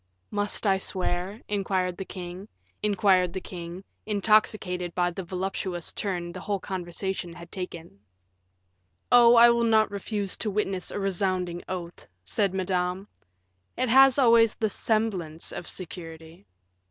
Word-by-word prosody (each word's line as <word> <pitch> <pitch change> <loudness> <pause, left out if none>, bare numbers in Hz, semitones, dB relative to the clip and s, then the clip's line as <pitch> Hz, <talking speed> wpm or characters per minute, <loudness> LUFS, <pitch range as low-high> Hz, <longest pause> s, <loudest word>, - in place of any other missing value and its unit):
"Must 205 +1 -1
I 195 -2 +3
swear?" 185 +2 -3
inquired 190 -3 -1
the 195 - -5
king, 180 -1 -7 0.4
intoxicated 190 0 0
by 175 -1 +1
the 190 +2 -6
voluptuous 185 -1 -3
turn 175 -4 -3
the 185 - -8
whole 200 +1 -2
conversation 185 -1 -4
had 170 0 -12
taken. 170 - -7 1.1
"Oh, 240 -1 +8
I 235 0 +8
will 235 0 +1
not 220 -2 +3
refuse 200 -1 -2
to 215 - -2
witness 195 -3 -1
a - - -4
resounding 185 -2 -1
oath," 175 -2 -6 0.2
said 195 - 0
Madame; 185 0 -1 0.7
"it 255 0 0
has 265 +2 +7
always 230 -4 +5
the 220 -2 -1
semblance 190 -9 -1
of 175 - -6
security." 165 0 -9
190 Hz, 125 wpm, -27 LUFS, 180-210 Hz, 1.1 s, Oh